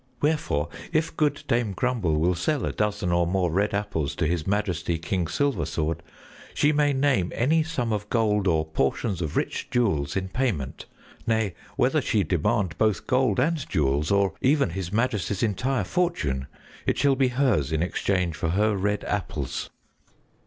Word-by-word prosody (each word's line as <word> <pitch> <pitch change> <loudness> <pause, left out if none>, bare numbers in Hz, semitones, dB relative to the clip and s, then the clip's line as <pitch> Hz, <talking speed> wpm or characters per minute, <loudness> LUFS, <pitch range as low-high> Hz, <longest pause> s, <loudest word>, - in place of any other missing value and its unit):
Wherefore, 90 - 0 0.2
if 160 0 0
good 150 -2 +1
Dame 115 -4 +1
Grumble 110 -7 0
will 90 +3 +3
sell 125 - 0
a - - -1
dozen 105 -3 -1
or 85 0 +2
more 90 -1 +1
red 100 +5 +1
apples 100 -8 -2
to - - 0
His 80 -1 -1
Majesty, 90 -4 0
King 85 +1 -2
Silversword, 85 - -1 0.6
she 145 - +3
may 145 -1 +3
name 135 -10 +1
any 155 +7 +3
sum 125 -8 -2
of 105 0 -3
gold 105 -4 +2
or 80 -3 +2
portions 80 - -1
of 80 -3 -2
rich - - -2
jewels 100 - +1
in 95 0 -1
payment; 95 - -2 0.4
nay, 110 -4 +1 0.2
whether - - +2
she 105 - +1
demand 90 +1 0
both 110 -4 +1
gold 125 -4 +2
and 155 +2 0
jewels, 75 -2 +1
or 100 -1 +2
even 140 - +3
His 90 0 -4
Majesty's 105 -3 0
entire 125 +5 0
fortune, 75 - -1 0.4
it - - +2
shall 140 -1 +3
be 130 0 +3
hers 125 - +1
in 80 +1 +1
exchange 90 -2 0
for 80 - -2
her 105 +4 +2
red 105 +2 -1
apples." 80 -9 -3
100 Hz, 165 wpm, -25 LUFS, 85-125 Hz, 0.6 s, will